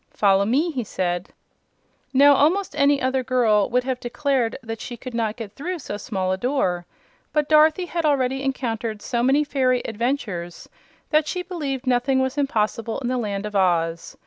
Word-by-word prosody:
"Follow 200 -1 +3
me," 290 +10 +1
he 260 -5 -3
said. 175 -3 -2 0.8
Now, 285 +2 +6
almost 320 +4 +2
any 285 -1 +3
other 260 0 0
little 255 - -6
girl 220 -5 +3
would 250 +1 +1
have 255 -1 -2
declared 245 -1 -1
that 225 -1 -6
she 240 - -7
could 255 +1 -8
not 225 -2 -1
get 225 -4 -7
through 350 - -4
so 260 -9 -6
small 190 -4 -2
a 185 - -1
door; 190 -9 -1 0.5
but 300 -1 +1
Dorothy 310 +3 +4
had 340 -1 -3
already 270 -3 +1
encountered 230 -5 -3
so 235 -2 -1
many 270 +4 +3
fairy 255 -3 +1
adventures 215 -7 -3 0.4
that 305 -1 +3
she 360 +2 -3
believed 285 -8 -4
nothing 255 +1 +2
was 260 +1 0
impossible 230 -5 -1
in 250 -3 -3
the 255 - 0
Land 205 -3 -3
of 210 -1 -6
Oz. 170 -3 0
250 Hz, 180 wpm, -23 LUFS, 215-280 Hz, 0.8 s, Now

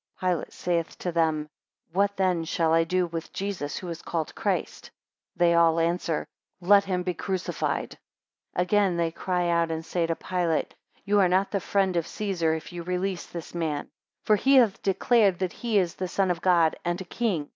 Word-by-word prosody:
6 - - -28
Pilate 180 -3 -1
saith 170 -2 -2
to 180 - -3
them, 160 -2 +1 0.5
What 200 +2 +1
then 185 -3 +1
shall 160 0 +1
I 165 0 +4
do 180 +1 +1
with 165 -1 -6
Jesus 195 -7 -3
who 185 - -6
is 165 -1 -6
called 160 -3 -3
Christ? - - -2
7 - - -14 0.4
They 170 0 +4
all 165 -1 +4
answer, 165 -1 0 0.3
Let 200 +2 +5
him 180 -2 -1
be 180 0 -1
crucified. 185 +2 -3 0.6
8 - - +3
Again 195 -2 +2
they 165 -1 0
cry 180 0 -1
out 170 -1 +2
and 160 0 -4
say 170 -1 -1
to 165 - 0
Pilate, 175 -3 -1 0.3
You 205 0 +3
are 185 -2 +4
not 190 +2 +2
the 200 - 0
friend 195 -1 0
of 170 - -1
Caesar, 175 -6 -1
if 160 +2 -8
you 175 - -5
release 180 +1 -2
this 170 -2 -8
man; 160 -4 -2 0.3
for 215 - +4
he 275 +6 +4
hath 235 -7 +4
declared 200 0 +3
that 185 -1 -2
he 230 -3 -1
is 180 -4 +2
the 185 - -4
Son 190 0 +1
of 170 -1 -3
God, 170 -3 +4
and 175 +1 -1
a - - -5
king. 175 -7 -2
175 Hz, 200 wpm, -26 LUFS, 165-190 Hz, 0.6 s, Let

